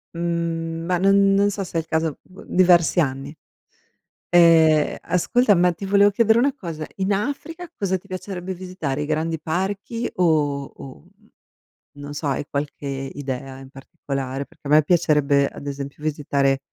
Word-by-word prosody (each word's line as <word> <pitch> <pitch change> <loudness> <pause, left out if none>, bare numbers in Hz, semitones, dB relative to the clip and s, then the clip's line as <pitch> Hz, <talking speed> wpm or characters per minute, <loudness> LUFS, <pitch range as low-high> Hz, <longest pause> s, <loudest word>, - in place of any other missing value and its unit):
Mhmm, 165 -1 -2
ma 180 +1 +1
n 195 +1 +4
non 200 +1 +3
so 200 0 -4
se 175 - -5
è - - +3
il 160 - -17
caso, 160 -2 -1
vu 185 - -15
diversi 180 -1 +4
anni. 135 -1 -1 1.0
Ehm, 165 -3 +5
ascolta, 215 +5 +2
ma 180 +1 +3
ti 175 +4 -7
volevo 200 +1 +5
chiedere 220 +2 +3
una 275 +3 +2
cosa. 165 - -6
In 195 +1 0
Africa 290 - -4
cosa 190 -2 0
ti 185 - -19
piacerebbe 185 -1 -5
visitare? 175 -6 -4
I - - -4
grandi 160 +1 -1
parchi 195 +8 -3
o 150 -5 +1
o - - -14 0.2
uhm, 200 +5 -27 0.7
non 145 0 -8
so, 145 +1 -5
hai 140 +1 -1
qualche 145 0 -4
idea 135 -1 -5
in 135 0 -12
particolare? 135 0 -5
Perché - - -20
a - - -3
me 155 +1 +6
piacerebbe 150 -4 +2
ad - - -11
esempio 140 +1 -6
visitare 140 -3 0
165 Hz, 165 wpm, -22 LUFS, 145-190 Hz, 1.0 s, me